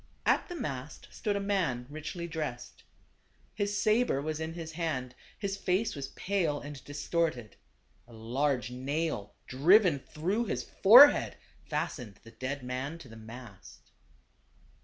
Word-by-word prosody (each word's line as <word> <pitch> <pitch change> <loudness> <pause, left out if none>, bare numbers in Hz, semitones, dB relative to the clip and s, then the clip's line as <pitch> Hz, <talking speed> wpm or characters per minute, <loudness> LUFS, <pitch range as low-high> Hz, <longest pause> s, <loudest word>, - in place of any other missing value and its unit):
At - - +2
the 355 - -5
mast 140 - -6
stood 205 -1 -2
a - - 0
man 185 -12 0
richly 155 +4 -6
dressed. 150 -7 -5 0.7
His 205 0 -1
saber 220 - +2
was 155 +2 -3
in 160 +1 -4
his 165 -2 -6
hand; 150 -7 -3 0.2
his 200 -1 -3
face 195 +2 0
was 140 -2 -5
pale 170 -6 -1
and 145 -1 -9
distorted. 145 -5 -2 0.5
A 120 - -16
large 125 +2 -1
nail, 135 -4 -3
driven 170 - +5
through 185 - -2
his 125 - -2
forehead, 250 - +7 0.3
fastened 115 -8 -3
the 115 - -13
dead 130 +4 -5
man 130 +5 -4
to 145 -7 -13
the 115 - -11
mast. 110 -2 -12
150 Hz, 140 wpm, -30 LUFS, 125-185 Hz, 0.7 s, forehead